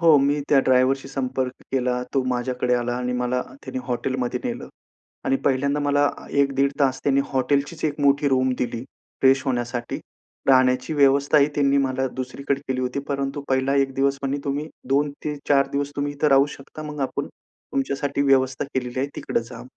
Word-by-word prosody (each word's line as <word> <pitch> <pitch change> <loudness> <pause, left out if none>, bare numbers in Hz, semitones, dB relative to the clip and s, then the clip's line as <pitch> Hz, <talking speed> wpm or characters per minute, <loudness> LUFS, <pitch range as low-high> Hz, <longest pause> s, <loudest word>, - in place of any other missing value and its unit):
हो, 165 -3 +7
मी 140 +2 +2
त्या 145 - +5
ड्रायव्हरशी 130 +1 +3
संपर्क 130 -1 -2 0.2
केला. 125 -1 0
तो 135 - +3
माझ्याकडे 125 0 0
आला 120 0 -1
आणि 125 0 -2
मला 125 0 0 0.2
त्याने 130 -1 -5
हॉटेलमध्ये 125 0 -2
नेलं - - -4 0.6
आणि 135 - +2
पहिल्यांदा 140 +2 +1
मला 145 0 +3 0.3
एक 140 0 +2
दीड 140 +1 +2
तास 130 -2 +2
त्यांनी 140 -1 +3
हॉटेलचीच 140 +4 0
एक 150 -1 -1
मोठी 140 0 +3
रूम 130 -1 +2
दिली. 120 0 -2 0.4
फ्रेश 135 0 +5
होण्यासाठी 120 -2 -2 0.5
राहण्याची 130 +1 +4
व्यवस्थाही 140 +1 +4
त्यांनी 140 -1 +3
मला 130 -1 0
दुसरीकडे 135 +2 -2
केली 130 -1 0
होती, 125 +2 -2
परंतु 140 0 -2
पहिला 130 +1 +2
एक 135 -1 +1
दिवस 140 0 +1
पण 135 +1 -1
तुम्ही 145 +2 -2 0.2
2 145 +2 +2
ते 150 - -1
4 140 -1 +4
दिवस 140 0 -1
तुम्ही 145 0 -1
इथे 145 +1 +1
राहू 135 0 +5
शकता. 140 +3 -10
मग 150 -1 -6
आपण 135 - -2
तुमच्यासाठी 140 +1 -3
व्यवस्था 130 -1 +2
केलेली 125 -1 -2
आहे 140 - -1
तिकडं - - -1
जा. 125 - -8
135 Hz, 175 wpm, -23 LUFS, 130-140 Hz, 0.6 s, हो